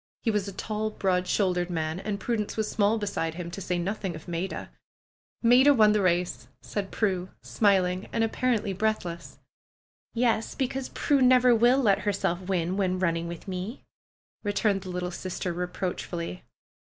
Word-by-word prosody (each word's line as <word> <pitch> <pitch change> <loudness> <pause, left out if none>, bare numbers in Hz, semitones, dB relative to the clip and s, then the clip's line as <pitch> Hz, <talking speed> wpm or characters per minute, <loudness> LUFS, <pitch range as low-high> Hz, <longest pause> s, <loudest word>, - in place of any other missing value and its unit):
He 225 - +2
was 210 -2 -1
a - - -4
tall, 215 +3 -3
broad 185 -3 0
shouldered 180 -3 +1
man, 160 0 -2
and 200 +1 -3
Prudence 220 -1 -2
was 215 -1 0
small 210 +1 +2
beside 200 -6 -2
him, 170 -1 -6
to 195 - -6
say 180 -1 -1
nothing 190 0 -3
of 155 - -11
Maida. 175 +2 -4 0.7
^^Maida 260 +4 +7
won 215 -1 +6
the 210 -1 +2
race!'' 180 -1 0
said 200 -2 -4
Prue, 190 -4 -1
smiling 190 -3 +2
and 225 - +1
ap 225 - 0
parently 230 -6 0
breathless. 180 -5 -2 0.8
^^Yes! 230 -2 +1
Because 265 0 -2
Prue 285 -2 +1
never 250 -1 +6
will 240 +3 +5
let 210 -8 +3
herself 195 -3 -1
win 180 -1 -1
when 185 -2 +1
running 170 -2 0
with 170 +2 -8
me," 190 +6 -5 0.6
returned 205 -1 +1
the 185 - -8
little 180 0 -3
sister 185 0 -4
reproach 180 +1 -3
fully. 175 +1 -5
195 Hz, 165 wpm, -27 LUFS, 180-220 Hz, 0.8 s, ^^Maida